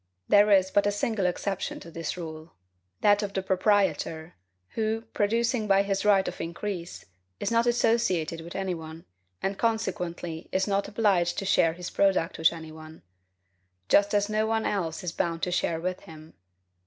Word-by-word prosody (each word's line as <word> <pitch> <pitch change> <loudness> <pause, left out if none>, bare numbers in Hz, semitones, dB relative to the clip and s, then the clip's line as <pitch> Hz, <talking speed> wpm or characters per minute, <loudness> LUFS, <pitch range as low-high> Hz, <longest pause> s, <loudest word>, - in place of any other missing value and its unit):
There 205 +1 +5
is 190 -2 +4
but 205 0 +3
a - - +2
single 205 -1 0
exception 195 +2 -3
to 170 - -11
this 165 +1 -4
rule, 160 -1 -8 0.5
that 205 0 +4
of 200 -1 -4
the 190 - -2
proprietor, 190 -4 +1 0.4
who, 220 0 -1
producing 230 +2 +1
by 195 0 +4
his 195 -1 -1
right 200 -2 +4
of - - -5
increase, 170 +1 -5 0.3
is - - -2
not 230 +1 +3
associated 225 -9 +1
with 170 +1 -10
any 190 -1 -1
one, 160 0 -9 0.4
and 195 0 -2
consequently 180 -7 -2
is 190 +1 +1
not 200 0 0
obliged 200 -5 +1
to 195 - -2
share 175 -4 +3
his 175 +1 -7
product 190 -4 +1
with 160 - +5
any 160 -2 -9
one; 155 0 -12 0.9
just 205 +1 +4
as 205 0 +2
no 215 0 0
one 225 0 0
else 170 -3 -2
is 175 - -2
bound 165 0 -2
to 180 - 0
share 170 -2 0
with 185 +2 -3
him. 160 0 -13
190 Hz, 175 wpm, -27 LUFS, 165-205 Hz, 0.9 s, There